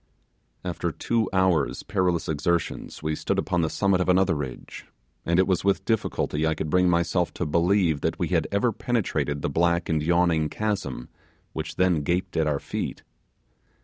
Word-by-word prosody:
After 85 -1 -2
two 110 +8 -1
hours' 95 -6 +1
perilous 90 -3 0
exertions 80 +1 -2
we 80 0 0
stood - - -2
upon 90 - 0
the 80 - 0
summit 100 0 +1
of 90 - 0
another 90 -1 +4
ridge, 75 -5 -6 0.4
and 85 0 +2
it 95 - +5
was 95 -3 0
with 100 0 +1
difficulty 100 -8 -1
I 80 - +1
could 75 - -4
bring 90 0 +4
myself 85 +1 +1
to - - -2
believe 85 0 +2
that - - -1
we - - -1
had - - +1
ever 100 +4 +2
penetrated 100 - -1
the - - 0
black 85 +3 +1
and 80 -2 +1
yawning 85 -1 +2
chasm 100 - -3 0.4
which - - -5
then 90 -4 +2
gaped 90 +4 -1
at 80 -1 +2
our 75 -2 0
feet. - - -5
85 Hz, 175 wpm, -25 LUFS, 80-95 Hz, 0.4 s, it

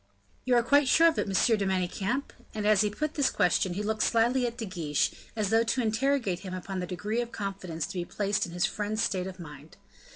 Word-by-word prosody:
"You 250 -1 +3
are 240 - +4
quite 285 +3 +4
sure 330 +6 +6
of 320 - -2
it, - - -1
Monsieur 200 +4 +3
de 205 - -2
Manicamp?" 190 +7 -1 0.2
and 210 -1 -2
as 210 -2 +5
he 210 - +2
put 305 +8 -3
this 285 -3 +2
question, 180 -1 +1
he 205 - -2
looked 215 +1 -1
slyly 240 +2 +2
at 235 0 -6
De 230 - -4
Guiche, 165 -7 -1 0.2
as 210 -2 -1
though 225 0 +5
to 240 +3 0
interrogate 225 -4 0
him 185 -1 -6
upon 185 +1 -5
the 180 - -3
degree 210 +6 -2
of 240 0 -6
confidence 185 -6 -4
to 195 -2 -5
be 175 - -3
placed 200 0 -1
in - - -10
his 175 0 +1
friend's 215 +1 -2
state 185 -2 -1
of 185 0 -9
mind. 150 -2 -11
205 Hz, 235 wpm, -28 LUFS, 185-235 Hz, 0.2 s, sure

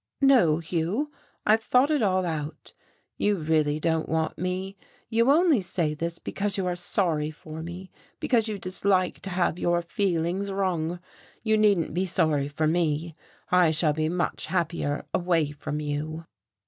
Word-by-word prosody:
"No, 245 - +5
Hugh, 175 - -2 0.3
I've 215 +1 +4
thought 255 +6 +3
it 295 -4 +2
all 185 -3 +2
out. 155 -2 -5 0.4
You 205 0 +2
really 155 -3 +1
don't 160 0 0
want 160 0 0
me. 185 +2 -3 0.3
You 230 +2 +3
only 310 - +5
say 170 -4 -1
this 170 +2 -4
because 205 0 -2
you 190 - -1
are 180 -1 -1
sorry 170 -5 0
for 155 0 -9
me, 175 +3 -8 0.3
because 230 -3 +2
you 215 -2 -3
dislike 185 0 0
to 195 - -5
have 180 -1 0
your 175 0 +1
feelings 180 +1 -1
wrung. 175 -3 -1 0.4
You 220 -1 +3
needn't 205 -8 +3
be 185 +3 0
sorry 155 -5 +1
for 145 +2 -1
me, 160 0 0 0.4
I 180 -2 +5
shall 155 -1 +2
be 155 +1 0
much 175 +1 -2
happier 165 -4 -1
away 170 -4 +1
from 150 +1 -5
you." 150 +2 -4
175 Hz, 160 wpm, -26 LUFS, 160-195 Hz, 0.4 s, No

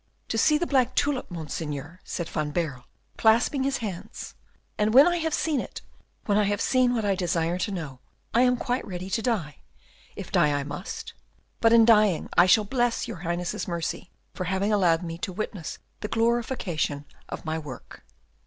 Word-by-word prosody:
"To 225 - -1
see 300 +5 +4
the 345 - -1
black 255 -5 +2
tulip, 285 -3 0
Monseigneur," 160 -1 -5
said 170 - -4
Van 155 -2 -2
Baerle, 145 -5 -3 0.3
clasping 230 +5 +4
his 275 +1 0
hands, 185 -4 -7 0.4
"and 215 +2 +1
when 275 +4 +9
I 350 0 +2
have 320 -1 -1
seen 305 -2 0
it, - - -7 0.4
when 205 -1 +2
I 210 - +3
have 205 0 0
seen 255 -1 +3
what 220 -3 -1
I 200 - +3
desire 175 -1 0
to 180 - -1
know, 155 -9 -5 0.3
I 235 - +4
am 250 0 +4
quite 245 +2 -1
ready 185 0 -6
to 225 - 0
die, 205 - -1 0.6
if - - -8
die 145 -1 +3
I - - -3
must; 145 +6 -6 0.5
but 225 - +4
in 230 -1 +7
dying 215 -6 +4
I 175 - +6
shall 210 +3 +5
bless 240 +1 0
your - - -6
Highness's 175 +1 -3
mercy 170 0 -3 0.2
for 185 - -4
having 190 +4 0
allowed 175 -4 +3
me 165 -1 -5
to 190 - -3
witness 190 -3 -5 0.2
the 210 - -4
glorification 225 - 0 0.2
of - - -7
my 160 0 -1
work." 145 -6 -10
195 Hz, 185 wpm, -26 LUFS, 165-235 Hz, 0.6 s, when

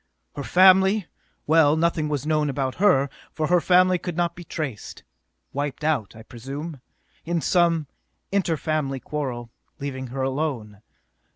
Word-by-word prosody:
Her 145 - -4
family 190 +4 +5 0.4
well, 155 -1 +5
nothing 160 -2 +1
was 145 -1 -2
known 155 -1 +1
about 135 -1 -2
her, 140 -10 +4 0.2
for 155 - -2
her 180 -1 +4
family 185 +1 +4
could 175 -1 -5
not 170 -1 0
be 175 - -9
traced. 150 - -6 0.5
Wiped 145 +1 -3
out, 130 -11 0
I 110 - -11
presume, 135 +5 -7 0.4
in 170 0 -1
some 170 -2 +2 0.5
inter 190 -5 +1
family 150 -4 -2
quarrel, 125 -4 -5 0.3
leaving 135 -3 -5
her 130 +2 -4
alone. 130 -7 -3
150 Hz, 145 wpm, -24 LUFS, 135-170 Hz, 0.5 s, family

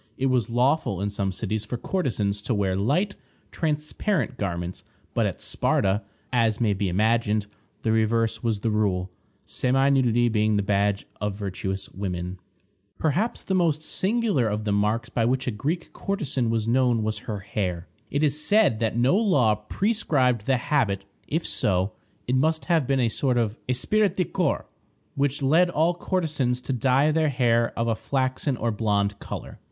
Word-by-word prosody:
It 135 0 +1
was 125 -2 +1
lawful 125 - +1
in 100 +1 -1
some 100 -1 -1
cities 105 +2 -3
for 115 +3 -4
courtesans 110 - -1
to 115 +2 -1
wear 95 -2 0
light, 145 - +1 0.4
transparent 155 +3 -1
garments; 90 -4 -4 0.3
but - - +2
at - - -5
Sparta, 100 +2 +1 0.3
as 115 -3 +2
may 110 -4 +2
be 100 -1 -1
imagined, 110 +2 +1 0.4
the 110 - +1
reverse 110 0 +1
was 110 -3 -1
the 115 - 0
rule, 95 -4 0 0.3
semi 135 +2 +2
nudity 120 -3 +3
being 110 -1 +2
the 100 - +1
badge 100 0 +1 0.2
of 105 -1 -1
virtuous 95 -1 -4
women. 90 -1 -4 0.6
Perhaps 175 - 0
the 190 - -2
most 165 -4 +2
singular 200 - +1
of 105 0 -2
the 105 - -1
marks 105 +3 +1
by 115 - 0
which 130 +3 +1
a 125 - 0
Greek 150 +11 -3
courtesan 145 - -2
was 115 -1 0
known 120 -2 +2
was 110 0 -2
her 105 -2 -3
hair. 95 -4 -3 0.2
It 145 +2 0
is 150 0 +1
said 205 - +3
that 115 -1 0
no 125 +8 +4
law 150 - +3
prescribed 125 - 0
the 135 -1 +3
habit; 110 -7 0 0.2
if 165 +3 -1
so, 95 0 +1 0.3
it 125 - -1
must 155 +5 +1
have 165 -7 +2
been 135 -1 +2
a 120 - +3
sort 125 +2 0
of 110 -3 0
esprit 205 +12 +2
de 180 - +1
corps - - -1 0.5
which 140 0 -1
led 165 +6 +4
all 165 +1 +2
courtesans 155 -9 -1
to 135 - -3
dye 135 +4 +3
their 155 0 +2
hair 120 -3 +2
of 115 - 0
a 115 - +1
flaxen 130 +2 -1
or 115 0 0
blonde 100 -2 0
color. - - -7
120 Hz, 170 wpm, -25 LUFS, 105-145 Hz, 0.6 s, no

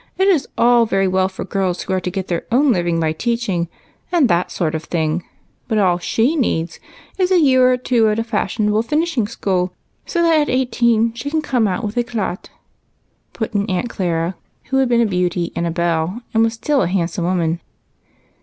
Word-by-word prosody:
It 380 - +3
is 335 -8 +2
all 235 0 +4
very 195 -2 +1
well 185 0 +1
for 190 - -7
girls 190 -3 -2
wdio - - -4
are 190 - +1
to 180 - -3
get 190 0 -4
their 170 -2 -3
own 270 +3 +4
living 175 -4 0
by 160 -1 +1
teaching, 200 -4 -1 0.4
and 335 -7 +4
that 175 +1 +1
sort 160 -2 -2
of 160 0 -4
thing; 160 0 -1 0.4
but 220 - 0
all 180 -4 +3
she 235 - +1
needs 170 - -1 0.4
is 365 -1 +2
a 370 -2 +4
year 260 -4 +5
or 250 - +2
two 240 -3 +2
at 210 - 0
a 225 - 0
fashionable 215 -1 0
finishing 295 -2 0
school, 185 -5 -1 0.3
so 340 -1 0
that 330 -2 +4
at 295 - -1
eighteen 235 -3 +2
she 240 +5 -5
can 310 +1 -1
come 245 -6 +1
out 190 +4 -2
with 210 -1 -3
edat^'' 230 -6 -2 0.8
put 225 0 -4
in 205 +1 0
Aunt 190 +6 -1
Clara, 170 -1 -1 0.4
who 265 - +2
had 265 -2 +2
been 235 -1 +3
a - - +3
beauty 180 -3 -1
and 170 - -1
a - - -1
belle, 170 +5 -1
and 225 - +3
was 225 0 +1
still 275 +5 +1
a 180 - +1
handsome 175 -1 -1
woman. 170 -2 0
210 Hz, 205 wpm, -19 LUFS, 180-245 Hz, 0.8 s, year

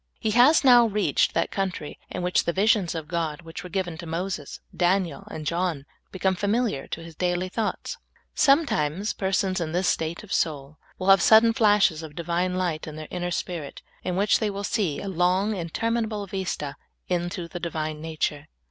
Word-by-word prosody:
He 220 - 0
has 250 +8 +6
now 245 -3 +7
reached 210 -1 +1
that - - +1
country 185 -6 -3
in 180 - -4
which 180 0 +2
the 170 - 0
visions 195 -3 +2
of 160 -2 -5
God 160 -2 -2
which 165 +3 -8
were 180 - -8
given 175 -3 -3
to 170 - -7
Moses, 165 -2 -4 0.2
Daniel, 175 -4 0
and 155 - -7
John 170 -3 -1 0.3
become 190 0 +1
familiar 205 - 0
to 165 - -6
His 165 -1 -11
dail}^ 180 +1 -1
thoughts. 230 - -3 0.3
Sometimes 210 - +2
persons 190 -1 0
in 160 -1 -3
this 180 +1 +1
state 165 +2 -1
of 210 - -13
sonl 145 -1 -1 0.2
will 185 - -5
ha\e 195 0 +8
sudden 225 +4 +6
flashes 205 -8 +3
of 155 -2 -9
Divine 175 +2 -1
light 175 -4 -2
in 155 - -7
their 155 0 -7
inner 175 -1 -2
spirit, 170 -4 -4 0.2
in 180 - -2
which 200 +2 +3
they 215 - 0
will 200 0 -5
see 195 -8 0
a - - -6
long, 190 +3 +1
interminable 215 +4 -2
vista 175 -7 -4 0.3
into 175 -1 -2
the 175 +1 -7
Divine 155 -2 -3
nature. 155 -2 -3
180 Hz, 185 wpm, -25 LUFS, 165-200 Hz, 0.3 s, ha\e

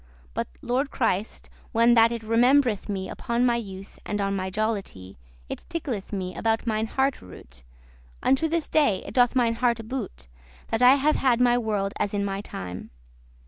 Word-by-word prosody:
But, - - -2 0.2
lord 260 +4 0
Christ, 220 -5 -2 0.3
when 230 +1 +5
that 230 0 +5
it 230 -1 -4
rememb'reth 235 0 +3
me 190 -2 -3
Upon 235 +1 -1
my 240 -1 +3
youth, 195 -3 -8
and 210 - -3
on 195 0 0
my 190 -1 -2
jollity, 195 - -4 0.3
It - - -7
tickleth 265 - -4
me 185 -3 -3
about 225 +1 0
mine 220 -1 0
hearte 270 +3 0
root; 60 -9 -13 0.6
Unto 270 +5 +3
this 330 0 -1
day 285 -11 +2
it - - -8
doth 245 0 +3
mine 230 -2 +2
hearte 235 -3 0
boot,* 255 - -4
*good - - -28 0.4
That 225 - -1
I 250 +2 +8
have 290 +2 +2
had 250 -3 +2
my 245 -1 +4
world 210 -4 -1
as 205 0 -1
in 200 0 0
my 195 0 -3
time. 90 - -7
225 Hz, 185 wpm, -25 LUFS, 195-250 Hz, 0.6 s, I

